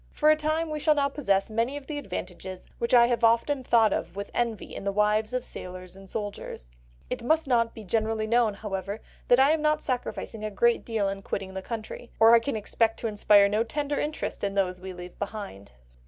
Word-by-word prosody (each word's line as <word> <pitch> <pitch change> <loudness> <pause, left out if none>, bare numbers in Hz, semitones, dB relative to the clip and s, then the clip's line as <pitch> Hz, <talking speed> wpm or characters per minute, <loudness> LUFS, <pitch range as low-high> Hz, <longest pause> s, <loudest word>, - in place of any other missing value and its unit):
For 305 0 +3
a - - +5
time 310 +1 -1
we 305 - -2
shall 305 0 +3
now 280 -1 +2
possess 200 -8 0
many 230 +6 0
of 285 - -9
the 295 0 -4
advantages 185 -7 -7
which 235 - -1
I 240 -1 +7
have 240 -1 0
often 235 +4 +3
thought 225 -4 +4
of 170 +2 -3
with 200 0 -6
envy 235 -3 -2
in - - -6
the 200 - 0
wives 210 +1 +1
of 250 -1 -2
sailors 185 0 -7
or 195 0 -13
soldiers. 200 - -6 0.4
It - - -2
must 315 +4 +2
not 230 -3 +2
be 220 - -9
generally 220 +2 0
known, 230 -2 +2
however, 200 0 -4 0.3
that 245 - +5
I 275 +3 +6
am 315 -1 +1
not 305 0 +1
sacrificing 245 -4 -4
a 215 - -2
great 235 +3 +2
deal 220 -4 -1
in 195 0 -3
quitting 195 -1 -4
the 190 - -4
country, 230 +2 -7
or 225 +1 +7
I 235 - +8
can 255 +2 -3
expect 225 +1 0
to 230 - -1
inspire 205 -1 +5
no 210 +2 +1
tender 290 +4 -2
interest 300 +1 -3
in 200 0 -1
those 185 -2 0
we 190 0 -6
leave 180 0 -10
behind." 200 - -6
225 Hz, 220 wpm, -27 LUFS, 200-250 Hz, 0.4 s, I